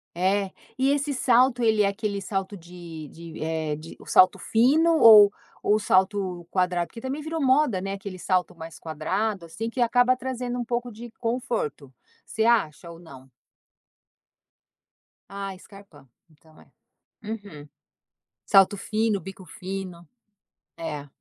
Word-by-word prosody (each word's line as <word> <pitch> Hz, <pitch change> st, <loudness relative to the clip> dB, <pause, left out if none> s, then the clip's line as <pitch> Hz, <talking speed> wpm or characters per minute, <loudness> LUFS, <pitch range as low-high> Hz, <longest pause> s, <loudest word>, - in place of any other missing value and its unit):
É. 190 Hz, +2 st, 0 dB, 0.3 s
E 265 Hz, +1 st, +2 dB
esse 285 Hz, 0 st, 0 dB
salto, 250 Hz, -1 st, +3 dB
ele 220 Hz, -2 st, +3 dB
é -, -, +3 dB
aquele 200 Hz, 0 st, -3 dB
salto 195 Hz, +1 st, -4 dB
de 170 Hz, -2 st, -10 dB
de, 165 Hz, 0 st, -11 dB
eh, 160 Hz, -1 st, -2 dB
de 155 Hz, +2 st, -11 dB
o -, -, -15 dB
salto 185 Hz, 0 st, +5 dB
fino 310 Hz, +9 st, +3 dB
ou 210 Hz, -5 st, +9 dB, 0.3 s
o 210 Hz, -, +3 dB
salto 185 Hz, -3 st, 0 dB
quadrado? 180 Hz, -2 st, 0 dB
Porque 230 Hz, -, -11 dB
também 270 Hz, +3 st, -4 dB
virou 320 Hz, +1 st, -4 dB
moda 260 Hz, -6 st, +3 dB
não 195 Hz, +1 st, -4 dB
é -, -, -2 dB
aquele 195 Hz, -1 st, -7 dB
salto 180 Hz, 0 st, -1 dB
mais 165 Hz, -1 st, -10 dB
quadrado, 185 Hz, +5 st, -3 dB
assim, 225 Hz, +8 st, -5 dB
que 245 Hz, -, -3 dB
acaba 245 Hz, +2 st, +3 dB
trazendo 250 Hz, -1 st, -4 dB
um 240 Hz, -, -3 dB
pouco 240 Hz, +1 st, -3 dB
de 235 Hz, +2 st, -10 dB
conforto. 230 Hz, -, -3 dB, 0.3 s
Você 220 Hz, -, -2 dB
acha 185 Hz, -9 st, +1 dB
ou 170 Hz, -, -10 dB
não? 135 Hz, -6 st, -14 dB, 2.0 s
Ah, 195 Hz, -1 st, -5 dB
scarpa, 195 Hz, -10 st, -16 dB, 0.2 s
então, 155 Hz, 0 st, -23 dB
é. -, -, -21 dB, 0.5 s
Uhum. 205 Hz, -9 st, -8 dB, 0.8 s
Salto 195 Hz, 0 st, +5 dB
fino, 215 Hz, 0 st, -1 dB
bico 190 Hz, 0 st, -10 dB
fino. 180 Hz, -2 st, -7 dB, 0.7 s
É. 150 Hz, -3 st, -6 dB
195 Hz, 145 wpm, -25 LUFS, 175-235 Hz, 2.0 s, ou